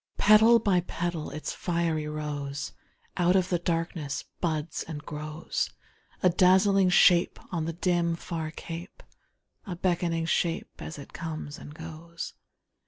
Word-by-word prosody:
Petal 220 +3 +7
by 200 -5 +3
petal 175 -2 -3
its 155 - -4
fiery 165 -3 -1
rose 145 -2 -4 0.5
Out 180 +1 +4
of 185 -1 +3
the 175 - +1
darkness 165 -4 -2 0.2
buds 160 -2 -1
and 155 -2 -6
grows; 150 +2 -3 0.5
A 185 - +7
dazzling 190 +2 +5
shape 175 0 +5 0.2
on 165 -3 0
the 165 - -2
dim, 170 -1 +1
far 165 -2 -4
cape, 165 +3 -8 0.6
A 180 - -3
beckoning 170 -2 0
shape 170 0 0
as 160 - -6
it 140 - -11
comes 155 -3 -5
and 150 - -10
goes. 165 +1 -7
170 Hz, 135 wpm, -28 LUFS, 155-180 Hz, 0.6 s, Petal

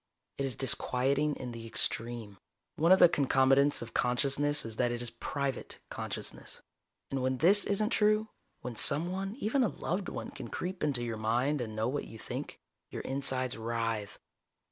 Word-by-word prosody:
It 140 - 0
is 130 - -3
disquieting 140 +3 +1
in 125 -2 -6
the 115 -1 -8
extreme. 115 -2 -2 0.4
One 165 +3 +3
of 190 - +9
the - - +8
concomitants 135 -2 +3
of 115 - -11
consciousness 140 +3 +2
is 110 -1 -6
that 120 -1 +1
it 120 - -3
is 120 -1 -2
private 140 -2 -4
consciousness. - - -5 0.5
And 135 -1 -1
when 130 0 0
this 195 +8 +5
isn't 210 +2 0
true, 215 +1 +2 0.3
when 125 -2 -6
someone, 180 - +2
even 260 +2 0
a 245 - +4
loved 185 0 -3
one, - - -6
can 130 -4 -8
creep 180 +9 -5
into 140 -5 +1
your 115 -2 -3
mind 125 +6 0
and 110 -2 -5
know 110 +1 0
what 140 +3 -2
you 115 - -11
think, - - -6 0.3
your - - -6
insides 130 -2 0
writhe. 115 -2 -3
135 Hz, 170 wpm, -31 LUFS, 120-150 Hz, 0.5 s, of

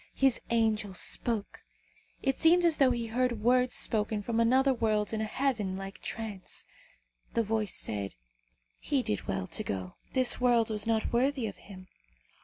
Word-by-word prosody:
His 270 -3 +3
angel 220 -4 +1
spoke. 220 +2 -1 0.6
It 270 -1 0
seemed 345 +2 +5
as 330 -2 +3
though 270 -2 +6
he 240 -2 -1
heard 235 -1 -1
words 250 +1 +3
spoken 215 -2 -1
from 230 +1 -1
another 260 +4 +4
world 215 -3 0
in 220 - -1
a - - 0
heaven 215 -6 -1
like 195 0 -8
trance. 215 -4 -6 0.7
The 230 - +3
voice 215 -2 -1
said, 100 - -3 0.6
"He - - 0
did 105 - -3
well 95 -1 -2
to - - -2
go. 95 -2 -5 0.2
This 255 -1 +3
world 235 -3 +3
was 210 0 0
not 225 0 0
worthy 260 +1 +1
of 205 - -5
him. 185 -2 -13
225 Hz, 165 wpm, -30 LUFS, 205-250 Hz, 0.7 s, though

